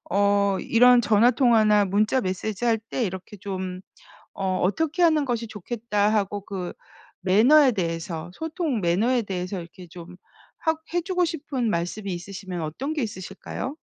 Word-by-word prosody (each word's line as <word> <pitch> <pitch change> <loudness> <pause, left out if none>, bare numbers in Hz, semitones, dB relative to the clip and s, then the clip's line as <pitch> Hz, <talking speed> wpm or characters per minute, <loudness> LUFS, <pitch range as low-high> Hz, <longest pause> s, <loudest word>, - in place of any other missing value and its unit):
어 200 0 +2
이런 245 +1 +5
'전화 225 +1 +4
통화나 220 -4 +4
문자 210 +6 +1
메시지 200 +2 -3
할 225 -2 +3
때 225 +3 -3
이렇게 190 +1 -6
좀 185 -2 -5 0.6
어 190 -1 0
어떻게 320 - +1
하는 315 -3 +4
것이 235 -3 -2
좋겠다' 210 0 -1
하고 205 -1 -1
그 185 -3 -5 0.5
매너에 250 +9 +5
대해서, 165 -2 -4
소통 320 - -2
매너에 215 +8 +1
대해서 185 -1 -4
이렇게 175 +1 -11
좀 175 +1 -11 0.5
하 320 - +2 0.2
해 350 - +2
주고 360 0 0
싶은 285 -8 -2
말씀이 185 +3 -2
있으시면 185 0 -6
어떤 210 - -4
게 305 - -2
있으실까요? 205 +6 -6
210 Hz, 310 characters per minute, -24 LUFS, 185-245 Hz, 0.6 s, 이런